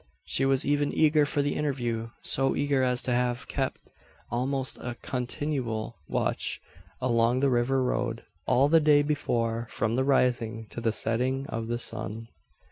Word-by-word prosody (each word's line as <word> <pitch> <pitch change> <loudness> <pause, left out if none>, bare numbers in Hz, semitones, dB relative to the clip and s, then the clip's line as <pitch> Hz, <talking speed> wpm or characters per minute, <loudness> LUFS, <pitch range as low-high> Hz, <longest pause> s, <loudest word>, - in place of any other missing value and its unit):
She 135 - +1
was 135 -1 +2
even 145 0 +1
eager 150 -1 +4
for 145 0 +1
the 145 - 0
interview 120 -6 -2
so 135 0 +1
eager, 140 -2 +1
as 125 -1 +1
to 125 - -1
have 125 0 0
kep - - -2 0.5
almost 130 +2 -1
a 120 -1 -5
continual 125 -3 -3
watch - - -1 0.4
along 120 0 +2
the 140 -1 +3
river 130 +2 +2
road, 120 -2 -1 0.2
all 135 +3 +4
the 165 +2 +5
day 150 -1 +5
before, 120 -6 -1
from 115 +2 -1
the 130 - +2
rising 120 -4 +1
to 115 - -6
the 115 -1 +1
setting 125 +5 0
of 115 0 -3
the 120 +1 -1
sun. 115 -1 -3
125 Hz, 160 wpm, -28 LUFS, 115-140 Hz, 0.5 s, the